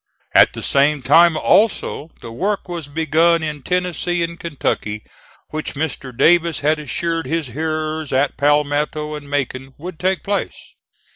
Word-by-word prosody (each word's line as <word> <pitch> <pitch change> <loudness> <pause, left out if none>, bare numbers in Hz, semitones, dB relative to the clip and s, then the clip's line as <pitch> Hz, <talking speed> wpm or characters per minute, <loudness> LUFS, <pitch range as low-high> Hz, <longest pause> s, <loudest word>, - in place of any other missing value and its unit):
At - - +6
the - - -7
same 140 0 +2
time 170 +4 +5
also 195 -7 +1
the 115 - -8
work 195 - -2
was 170 -4 -5
begun 160 +2 +2
in 150 -2 -4
Tennessee 180 0 -1
and 170 0 -5
Kentucky 110 -9 -3 0.5
which 155 -1 -5
Mr. 140 -3 -3
Davis 165 +6 +3
had 150 +2 +2
assured 165 +3 -2
his 160 -5 -2
hearers 155 +2 -3
at 135 +2 +1
Palmetto 150 +1 +1
and 145 -1 -8
Macon 135 -1 -3
would 170 +1 -8
take 185 +1 0
place. 200 0 -4
155 Hz, 145 wpm, -19 LUFS, 145-170 Hz, 0.5 s, At